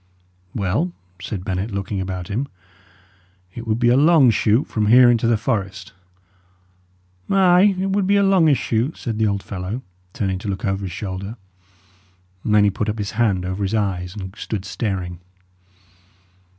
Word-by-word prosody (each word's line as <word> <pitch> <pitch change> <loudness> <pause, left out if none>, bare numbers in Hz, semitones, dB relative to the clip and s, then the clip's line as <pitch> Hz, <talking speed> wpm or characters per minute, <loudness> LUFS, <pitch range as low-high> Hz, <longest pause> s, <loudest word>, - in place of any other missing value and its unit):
"Well," 110 - -1 0.3
said 95 -1 -5
Bennet, 95 +1 -2
looking 100 -1 -3
about 95 -1 -4
him, 115 +7 -2 1.1
"it 115 -1 -8
would 110 0 +1
be 120 0 +3
a 120 - +5
long 145 -3 +6
shoot 110 +4 +2
from 105 -2 -1
here 120 +2 +7
into 115 -1 +1
the 115 -1 +3
forest." 100 -5 -3 1.4
"Ay, 190 +1 +5
it 190 +1 -1
would 195 -1 +1
be 200 - +3
a 200 - +4
longish 175 -8 +4
shoot," 120 +7 -1
said 115 -3 -4
the 110 - +3
old 100 -1 -1
fellow, 100 +6 -5 0.3
turning 95 -3 -2
to 100 - -7
look 100 +2 -3
over 95 0 -1
his 90 - -5
shoulder; 95 +3 -6 1.1
and 105 - +1
then 105 - +6
he 100 - +3
put 105 +2 -2
up 105 - -2
his 100 -2 -3
hand 100 -5 +1
over 95 +2 -3
his 100 +2 0
eyes, 95 -3 -2
and 95 -1 -7
stood 105 -3 -5
staring. 95 -4 -3
105 Hz, 170 wpm, -21 LUFS, 95-120 Hz, 1.4 s, here